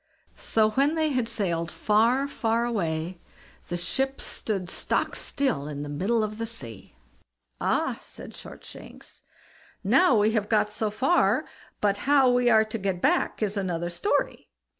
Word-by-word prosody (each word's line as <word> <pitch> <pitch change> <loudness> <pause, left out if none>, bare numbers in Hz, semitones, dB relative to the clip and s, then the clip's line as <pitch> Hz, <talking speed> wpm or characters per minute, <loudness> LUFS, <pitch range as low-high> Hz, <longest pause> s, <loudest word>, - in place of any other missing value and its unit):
So 215 -1 +1
when 280 +7 +2
they 315 -1 +1
had 255 -5 0
sailed 175 -7 -2
far, 235 +6 +2
far 230 -3 0
away, 170 -6 -2 0.5
the 175 - -3
ship 270 +10 -1
stood 195 -5 -4
stock - - -1
still 160 - -1
in 145 -1 -5
the 145 - -6
middle 200 +10 0
of 215 +1 -4
the 230 - -2
sea. 115 - -10 0.6
"Ah!" - - 0
said - - -11
Shortshanks, - - -12 0.6
"now 260 - +5
we 210 +1 +3
have 215 -2 -1
got 210 -1 +2
so 215 0 -1
far; 260 +12 +2 0.4
but 205 -1 +2
how 275 -3 +6
we 245 0 +3
are 220 -1 +5
to 220 +1 -5
get 190 -2 -2
back 300 - +1
is 205 0 -1
another 175 -3 -2
story." 405 - -1
215 Hz, 155 wpm, -26 LUFS, 180-245 Hz, 0.6 s, how